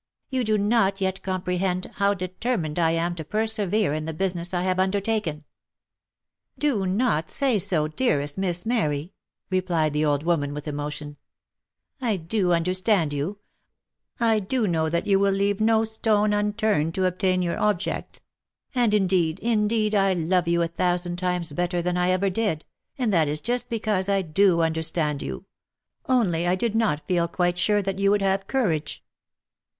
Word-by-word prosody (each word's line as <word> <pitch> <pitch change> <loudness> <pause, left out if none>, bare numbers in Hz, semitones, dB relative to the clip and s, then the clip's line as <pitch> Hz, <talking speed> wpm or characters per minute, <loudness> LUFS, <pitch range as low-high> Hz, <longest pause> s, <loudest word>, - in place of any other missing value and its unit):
" - - -57
You 260 -1 0
do 215 -1 +1
not 205 -2 +2
yet 190 0 -1
comprehend 185 -1 -2
how 200 0 +2
determined 185 -2 -3
I 165 -1 +3
am 165 +1 0
to 165 -2 -6
persevere 215 -1 0
in 155 0 -3
the 160 -1 -5
business 175 -1 -1
I 180 -1 -1
have 185 0 0
undertaken." 190 -4 0 0.6
" - - -60
Do 205 -9 0
not 185 -5 +1
say 260 -6 +1
so, 160 -4 +1
dearest 150 - 0
Miss 180 -1 -2
Mary 170 -9 -1 0.2
!" - - -59
replied 175 -5 +1
the 150 +1 +1
old 145 -1 +1
woman 145 -4 0
with 150 +1 -7
emotion, 145 0 -5 0.4
" - - -65 0.3
I 225 -5 0
do 180 +2 0
understand 180 -1 +2
you, 170 +9 -3 0.4
— - - -61
I 225 -2 +3
do 225 +4 -1
know 160 -4 0
that 170 +1 -1
you 195 -1 +3
will 200 0 +3
leave 200 +1 0
no 220 0 +3
stone 215 -1 +1
unturned 205 -6 0
to 190 - +1
obtain 185 0 +1
your 170 -1 -2
object, 210 -4 -2 0.3
— - - -67
and 240 -5 +2
indeed, 180 -5 +2
indeed, 215 -1 +1
I 195 -2 +3
love 175 +1 +1
you 170 0 +2
a - - 0
thousand 175 +1 -1
times 180 -3 -2
better 175 +2 -1
than 175 +1 -1
ever 185 +2 +1
I - - +3
did, 190 -5 -1 0.3
and 240 -6 0
that 160 -4 +3
is 150 +1 -2
just 245 +8 -2
because 210 -4 0
I 195 -1 +2
do 170 +1 +3
understand 160 -2 0
you; - - -6 0.6
only 180 -10 +2
I 180 - +3
did 220 +3 -1
not 205 -10 0
feel 175 -2 +1
quite 175 0 0
sure 205 +3 +2
that 195 0 -3
you 195 0 +3
would 205 0 +2
have 195 0 0
courage." 165 - -1
185 Hz, 180 wpm, -24 LUFS, 165-210 Hz, 0.6 s, I